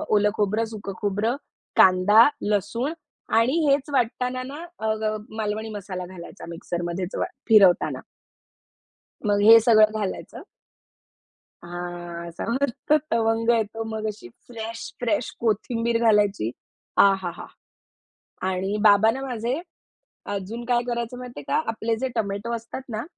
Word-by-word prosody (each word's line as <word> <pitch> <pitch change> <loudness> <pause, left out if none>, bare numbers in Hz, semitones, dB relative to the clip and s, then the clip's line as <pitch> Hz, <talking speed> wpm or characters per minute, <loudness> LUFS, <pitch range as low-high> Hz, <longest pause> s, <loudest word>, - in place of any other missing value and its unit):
ओलं 210 0 +4
खोबरं, 215 +2 +1
सुक 200 -2 -6
खोबरं, 210 +4 0 0.4
कांदा, 190 +5 +7 0.2
लसूण 230 - -1 0.5
आणि 255 +7 +2
हेच 280 +1 +2
वाटताना 250 0 0
ना, 285 +6 -7
अ, 220 0 0
ग 215 0 0 0.2
मालवणी 215 0 -2
मसाला 185 -2 -5
घालायचा 180 -1 -10
मिक्सरमध्येच 175 +2 -4
वा - - 0 0.2
फिरवताना. 200 -5 +5 1.3
मग 205 -1 +2
हे 225 +2 +10
सगळं 215 -2 +5
घालायचं. 200 -3 -5 1.2
हां, 175 -1 -6
असा 170 - -6
मस्त 280 +3 0 0.2
तवंग 225 0 +1
येतो, 225 -1 +1
मग 220 0 -4
अशी 210 - -6 0.2
फ्रेश, 230 -1 -7
फ्रेश 230 -1 0
कोथिंबीर 230 +1 0
घालायची. 205 - +3 0.5
आ! 200 - +7
हा! 175 -2 -3
हा! - - -8 1.0
आणि 190 +2 -1
बाबा 210 +1 +6
ना, 260 +4 -4
माझे 245 +3 -2 0.7
अजून 205 +5 -5
काय 240 0 +2
करायचं 235 0 -3
माहितीये 245 - -8
का? - - +2
आपले 225 0 -1
जे 265 - 0
टोमॅटो 205 +1 -2
असतात 230 +3 -7
ना, 220 - -3
220 Hz, 130 wpm, -24 LUFS, 200-235 Hz, 1.3 s, हे